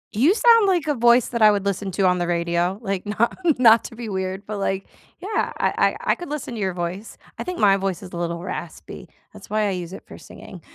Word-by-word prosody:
You 295 - +4
sound, 460 -3 +5
like, 355 -4 +1
a 300 - +1
voice 240 -1 +4
that 235 -2 -3
I 215 - +8
would 200 -1 0
listen 200 0 -2
to 195 - 0
on 180 0 +2
the 175 - -1
radio, 170 +2 0
like, 195 -3 -2
not 215 +3 0 0.2
not 230 -2 +6
to 230 - -9
be 230 -2 -7
weird, 190 +1 -4
but, 210 -1 -5
like 195 0 -2 0.3
yeah, 410 +3 -2
I - - +1
I - - +1
I - - +2
could 350 - -9
listen 290 -4 -5
to 225 - -6
your 190 -2 -1
voice, 180 +5 -5 0.2
I - - -2
think 365 0 -5
my 200 -2 +4
voice 190 -3 -3
is 180 - -10
a 170 - -5
little 170 0 -3
raspy, 170 - -8 0.2
that's 95 - -14
why 215 0 +1
I - - -1
use 180 -2 -5
it - - -10
for - - -12
singing. - - -12
200 Hz, 250 wpm, -22 LUFS, 180-235 Hz, 0.3 s, I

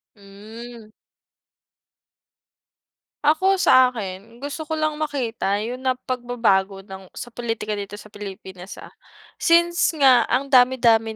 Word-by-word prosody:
Hmm. 215 +3 -12 2.4
Ako 375 +6 +3
sa 260 -8 +5
akin, 210 +2 -8
gusto 295 +2 -5
ko 320 - -2
lang 310 -1 -1
makita 235 -9 -2
yung 245 +3 -5
na 255 - +3
pagbabago 240 -7 -1
ng 190 -1 -11
sa 245 - -7
politika 225 -3 -4
dito 200 0 -6
sa 210 0 -13
Pilipinas, 190 -2 -9
ah. - - -12 0.5
Since 340 0 +3
nga 250 -4 +6
ang 270 +3 0
dami-dami 235 -3 +4
235 Hz, 120 wpm, -22 LUFS, 205-260 Hz, 2.4 s, nga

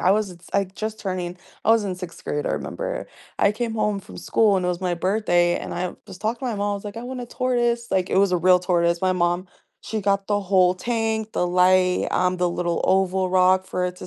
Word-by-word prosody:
I 185 - +4
was, 205 -4 -1 0.2
like, 195 -1 0
just 215 +1 -4
turning 180 -2 -3 0.3
I - - +4
was 225 -1 +5
in 190 -2 -3
6th 180 -2 -9
grade, 145 0 -2
I - - 0
remember. - - -4 0.3
I - - +5
came 225 +1 -3
home 210 -2 0
from 90 - -12
school, 200 - +2
and 185 - -1
it - - +1
was 175 0 -2
my 180 -2 0
birthday, 175 -2 +1
and - - -6
I 180 0 -3
was - - -10
talking 220 +5 -2
to - - -5
my 240 -3 -1
mom, 205 0 -1
I - - -1
was 200 - -7
like, 205 +1 -7
"I 230 - -5
want 255 +1 -6
a - - -7
tortoise," 240 -2 0
like, 185 -1 +1
it - - 0
was 195 0 +4
a - - +4
real 180 +1 +5
tortoise. 170 -1 +1
My 185 0 +2
mom, 175 +1 0 0.3
she 220 - -4
got 200 0 0
the 205 -1 +1
whole 185 -2 +3
tank, 220 +1 -2
the 180 - 0
light, 180 0 +3
um, 180 0 +1
the 180 0 +1
little 175 -1 -1
oval 190 0 +2
rock 185 0 +3
for 180 -1 -2
it 180 0 -3
to 180 - -9
190 Hz, 250 wpm, -23 LUFS, 180-215 Hz, 0.3 s, was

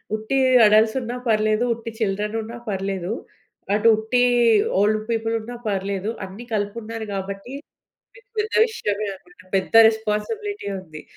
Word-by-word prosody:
ఉట్టి 220 +5 -2 0.3
అడల్ట్స్ 215 +2 +4
ఉన్నా 240 0 -5
పర్లేదు, 215 +1 +2
ఉట్టి 230 0 -7
చిల్డ్రన్ 210 +1 -1
ఉన్నా 230 +2 -8
పర్లేదు. 195 -1 -3 0.6
అటు 215 +2 +3
ఉట్టి 220 +3 +1 0.6
ఓల్డ్ 215 +2 +3
పీపుల్ 225 0 -1
ఉన్న 240 +3 -8
పర్లేదు. 195 0 -2 0.2
అన్నీ 195 +6 -10
కలిపున్నారు 220 +2 -3
గాబట్టి 195 +5 -5 0.6
మీకు 475 +2 -19
పెద్ద 425 +1 -1
విషయమే 210 - -3
అనమాట. 355 - -19 0.2
పెద్ద 190 +4 -2
రెస్పాన్సిబిలిటీయే 220 - -3
ఉంది. 155 -3 -11
215 Hz, 130 wpm, -22 LUFS, 200-230 Hz, 0.6 s, అడల్ట్స్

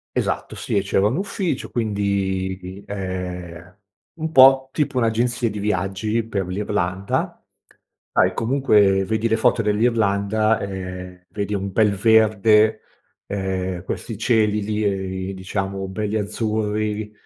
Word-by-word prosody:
Esatto, - - -2
sì, - - -2
e 100 - +1
c'era 100 0 +2
un 125 - -1
ufficio, 195 -6 -3
quindi, 95 -3 -2
ehm, 90 -2 -6 0.4
un 160 0 -3
po' 135 -1 +7
tipo 140 -4 0
un'agenzia 120 +1 +1
di 105 - -6
viaggi 105 +2 -1
per 100 -4 -3
l'Irlanda. 95 0 -2 0.7
Sai - - +3
comunque 105 -6 +3
vedi 110 +2 0
le 115 0 +1
foto 115 +1 +2
dell'Irlanda, 110 0 +2
ehm, 90 -2 -7
vedi 105 0 -3
un 100 0 -3
bel 105 0 +3
verde, 110 0 +4 0.4
ehm, 95 -2 -3
questi 110 +3 -5
cieli 110 -3 +2
lì 105 +1 -2 0.5
e - - -4
diciamo 95 +1 -4
belli 105 +2 -2
azzurri, 105 0 -2
105 Hz, 120 wpm, -22 LUFS, 95-110 Hz, 0.7 s, po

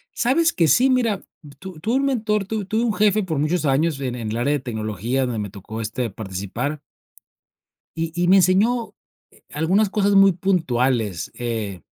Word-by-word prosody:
Sabes 320 +8 +2
que 165 -3 +2
sí, 260 +2 +4
mira, 230 -6 +1 0.3
tu 190 +2 -8
tu 155 - -14
tuve 230 +9 0
un 275 - +1
mentor 215 -6 0
tu 210 0 -3
tuve 220 +5 -1
un 220 - 0
jefe 210 0 +3
por 160 -6 -3
muchos 155 +2 0
años 145 +2 +1
en 125 -2 -3
en 115 -3 -5
el 110 - -3
área 130 +5 0
de 145 - 0
tecnología 110 +1 -3
donde 120 -3 -3
me 100 -2 -4
tocó, 105 +3 -8
este, 115 +1 -3
participar. 105 +9 -5 1.2
Y 165 0 -3
y 175 0 0
me 195 - +7
enseñó, 205 +6 +2 0.4
eh, - - -24
algunas 190 +7 +1
cosas 205 -1 +1
muy 195 -1 +6
puntuales, 130 - 0
eh. 110 -6 -4
160 Hz, 185 wpm, -22 LUFS, -, 1.2 s, me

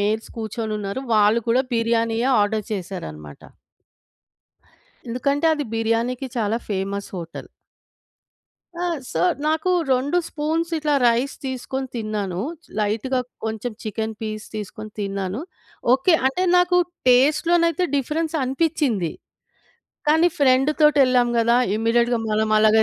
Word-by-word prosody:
Males 215 +2 0
కూర్చొనున్నారు. 215 +1 -4
వాళ్ళు 215 +2 +4
కూడా 250 +3 +3
బిర్యానీయే 230 +1 +1
order 210 0 0
చేసారనమాట. 80 - -6 1.7
ఎందుకంటే, 280 +6 0
అది 295 -2 -3
బిర్యానీకి 230 +3 0
చాలా 220 -1 0
ఫేమస్ 200 0 -3
హోటల్. 170 -2 -7 1.3
ఆ! - - 0 0.2
సో, - - -2 0.3
నాకు 315 +3 +1 0.2
2 270 +7 +1
స్పూన్స్ 320 +3 -2
ఇట్లా 300 -1 0
రైస్ 240 +4 0
తీసుకొని 260 +1 -4
తిన్నాను. 210 -5 -3 0.4
లైట్‌గా 225 +5 0 0.2
కొంచెం 220 +2 -3
చికెన్ 220 0 -3
పీస్ 215 -1 -5
తీసుకొని 215 0 -6
తిన్నాను. 195 +2 -3 0.5
ఓకే. 270 +8 +4
అంటే 270 +8 0
నాకు 360 0 +4 0.3
టేస్ట్‌లోనైతే 330 +7 +3
డిఫరెన్స్ 310 +4 -2
అనిపిచ్చింది. 265 - 0 1.0
కానీ, 320 +3 +5
ఫ్రెండ్ 270 +1 +4
తోటెళ్ళాం 260 -5 +4
గదా! 235 +1 +4 0.2
ఇమ్మీడియేట్‌గా 235 +2 +2
మనం 215 0 +1
అలాగా 215 +1 +5
235 Hz, 110 wpm, -22 LUFS, 215-275 Hz, 1.7 s, కానీ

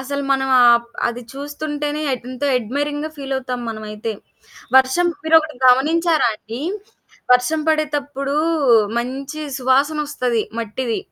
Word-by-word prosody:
అసలు 280 +1 -3
మనం 265 0 +1 0.2
ఆప్ 235 0 +3 0.2
అది 240 +1 -5
చూస్తుంటేనే, 295 +1 -4
ఎంతో 255 +3 -5
ఎడ్మైరింగ్‌గా 290 +6 -2
ఫీలవుతాం 265 -2 -3
మనమైతే. 215 0 -5 0.6
వర్షం 265 +7 +4 0.2
మీరొకటి 315 -2 +3
గమనించారా 315 +6 +3
అండి? 230 +3 -8 0.7
వర్షం 250 +6 +2
పడేతప్పుడు 285 -2 -1 0.6
మంచి 270 +5 -5 0.2
సువాసన 275 +4 +2
ఒస్తది, 240 -5 0 0.2
మట్టిది. 230 +1 -2
270 Hz, 105 wpm, -20 LUFS, 250-295 Hz, 0.7 s, వర్షం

